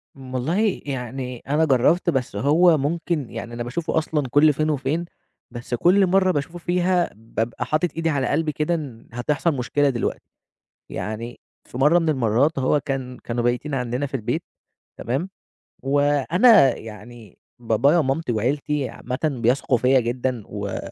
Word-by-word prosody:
م 130 -2 -11
والله 180 - 0
يعني 125 -2 -5
أنا 155 +2 +3
جرّبت، 155 +6 +3
بس 130 -6 -1
هو 160 +4 +4
ممكن 150 -1 -2
يعني 120 - -7
أنا 120 0 -4
باشوفه 160 +8 -3
أصلًا 155 -3 0
كل 145 +4 +5
فين 155 +2 -1
وفين، 150 +4 -1 0.5
بس 120 +1 -7
كل 185 +9 +4
مرّة 185 0 +3
باشوفه 155 +3 -3
فيها 175 0 +1
بابقى 115 +2 -4
حاطط 155 +6 0
إيدي 165 0 0
على 140 -4 0
قلبي 155 +1 0
كده 150 +3 -1
إن 135 -8 -7
هتحصل 145 +7 0
مشكلة 140 +3 +1
دلوقتي، 120 -3 -2 0.7
يعني 115 +3 -6 0.3
في 125 - -8
مرّة 150 +6 +5
من 165 -2 0
المرّات 135 +2 +1
هو 135 +3 +2
كان 130 -3 -4
كانوا 120 0 -2
بايتين 125 +4 -1
عندنا 125 +2 -2
في 135 - -12
البيت، 125 +6 -2 0.6
تمام؟ 135 - -2 0.5
وأنا 145 - +4
يعني 110 -1 -12 0.2
بابايا 120 +7 +2
ومامتي 140 -2 0
وعيلتي 135 +4 -1
عامةً 125 +1 -5 0.2
بيثقوا 125 +2 +2
فيّا 130 +2 +4
جدًا، 120 -1 -2
و 100 -2 -5
135 Hz, 150 wpm, -22 LUFS, 120-160 Hz, 0.7 s, كل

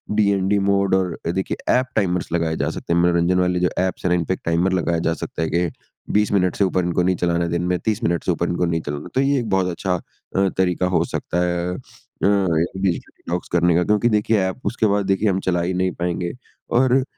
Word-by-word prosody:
DND 100 -1 +2
mode 100 -1 +2
और 90 -3 0 0.2
देखिए 95 - -2 0.2
app 130 - -1
timers 90 -6 0
लगाए 85 -2 0
जा - - 0
सकते 85 - -3
हैं। 85 - +3
मनोरंजन 85 +1 +2
वाले 90 -1 +1
जो 90 - +2
ऐप्स 95 0 -2
है 90 - +3
ना 90 - +3
इनपे 90 +2 0
टाइमर 85 +3 +2
लगाया 85 -2 0
जा 80 - +2
सकता 80 - -5
है 80 - 0
कि 85 +1 +1 0.4
20 105 0 +2
मिनट 90 -3 +2
से - - +2
ऊपर 90 0 0
इनको 90 0 +1
नहीं 90 0 +2
चलाना 85 0 0
है 85 - -2
दिन 85 0 -1
में, 90 0 +1
30 110 +1 -2
मिनट 85 -5 0
से - - +1
ऊपर - - -1
इनको 90 0 0
नहीं 80 -1 -1
चलाना 75 0 -5
है। - - -9
तो 130 - +3
ये 140 0 +2
एक 115 -3 -4
बहुत 95 -1 +2
अच्छा 90 +1 -1
अ, 95 +2 -3
तरीका 90 -1 +1
हो - - +3
सकता 90 - -2
है 85 0 -1
अ, - - -6 0.5
डिजिटल 95 -1 +1
डिटॉक्स 90 +1 -4
करने 85 -1 +3
का। 90 - +3
क्योंकि 105 +5 +2
देखिए 105 -2 +2
एप 95 +7 -6
उसके 115 - 0
बाद 100 0 +1
देखिए 95 +2 +2
हम 95 -1 +1
चला 90 -1 +1
ही 90 +2 -1
नहीं 90 0 0
पाएँगे। 85 0 -2 0.5
और 130 +1 +3
90 Hz, 240 wpm, -21 LUFS, 85-100 Hz, 0.5 s, हैं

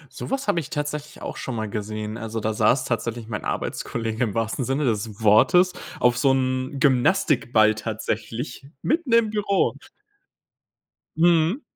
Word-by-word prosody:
Sowas 270 0 -3
habe 170 - +2
ich 145 - -8
tatsächlich 150 +2 -5
auch - - -6
schon 130 - -4
mal 110 -1 -3
gesehen. 105 +1 -4
Also, 115 0 -4
da 110 +1 -1
saß 130 +4 +2
tatsächlich 115 -1 -3
mein 105 -3 -5
Arbeitskollege 115 +1 -2
im 105 - -3
wahrsten 115 +3 -1
Sinne 135 +3 0
des 110 -2 -2
Wortes 175 - +5 0.3
auf 125 0 +3
so 135 0 +4
'nem 130 +1 -1
Gymnastikball 125 - +3
tatsächlich 110 +4 -4 0.2
mitten 315 -4 0
im 225 -2 +4
Büro. 205 -2 +1 1.4
Mhm. 170 - +3
125 Hz, 145 wpm, -24 LUFS, 110-150 Hz, 1.4 s, Wortes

